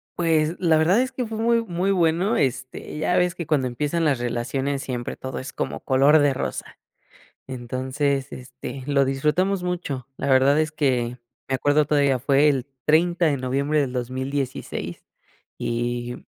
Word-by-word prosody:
Pues, 165 -1 +1
la 165 -3 +3
verdad 175 +8 +4
es 260 - -2
que 250 -1 -3
fue 220 0 -5
muy 230 +1 +2
muy 185 0 -1
bueno, 180 +4 +2
este, 130 +1 -2
ya 155 +4 +1
ves 180 -1 +2
que 170 - -5
cuando 145 -4 +1
empiezan 150 +7 -1
las 145 -5 +2
relaciones 135 +3 -2
siempre 120 -2 -4
todo 130 -1 -6
es 130 - -6
como - - -3
color 140 +3 +4
de 145 -1 +3
rosa. - - -5 0.7
Entonces, 130 +2 -2
este, 130 +1 -8
lo 140 -1 +3
disfrutamos 155 +8 +1
mucho. 160 -8 -3
La 140 - -3
verdad 135 +3 +4
es 155 -1 0
que 125 -5 0 0.3
me 135 - 0
acuerdo 145 +2 +2
todavía 140 -3 +2
fue 140 +3 +3
el 135 -3 0 0.2
30, 170 +2 +3
de 140 -2 +1
noviembre 140 +4 0
del 135 -3 -1
2016, 130 +2 -4 0.6
y 120 0 -3
140 Hz, 160 wpm, -23 LUFS, 130-160 Hz, 0.7 s, verdad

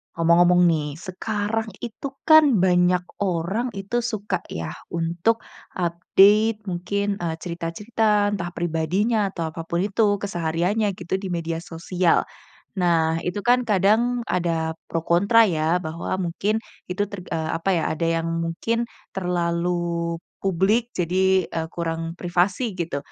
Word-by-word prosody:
Ngomong-ngomong 175 +1 +5
nih, 155 -3 0
sekarang 215 +4 -3
itu 240 +4 -6 0.2
kan, 315 0 +9 0.2
banyak 180 0 +4 0.2
orang 190 +7 -1
itu 200 +4 -2
suka 210 -6 -2
yah, 80 -1 -5 0.2
untuk 170 +7 0 0.3
update 205 +5 +3
mungkin, 200 +3 -1
eee, 170 -4 -3
cerita-cerita, 205 +5 0
entah 175 -2 -4
pribadinya, 180 +6 0
atau 165 -3 -3
apa 165 - -5
pun 170 +1 -2
itu 205 +1 +2
kesehariannya, 185 +3 0
gitu, 175 +1 -2
di 190 -1 -4
media 165 -1 -3
sosial. 175 +1 0 0.5
Nah, 165 -2 +2
itu 180 +3 -2
kan 245 +2 +3
kadang 220 +4 +2
ada 165 -2 -1
pro 165 - -2
kontra 200 +8 +4
ya, 170 -3 +1
bahwa 165 +2 -4
mungkin 205 +6 -1 0.2
itu 180 +3 -2
terg 200 -4 -8
eee, 160 -1 -2
apa 190 +3 +1
ya, 165 - 0
ada 160 +1 -1 0.2
yang 165 - -3
mungkin 165 +8 -1 0.2
terlalu 170 -1 -1 0.2
publik, 195 +6 +1
jadi, 185 +1 +2
eee, 160 -1 -4
kurang 165 0 -4
privasi, 185 +6 0
gitu. 170 -5 -3
180 Hz, 130 wpm, -23 LUFS, 170-205 Hz, 0.5 s, kan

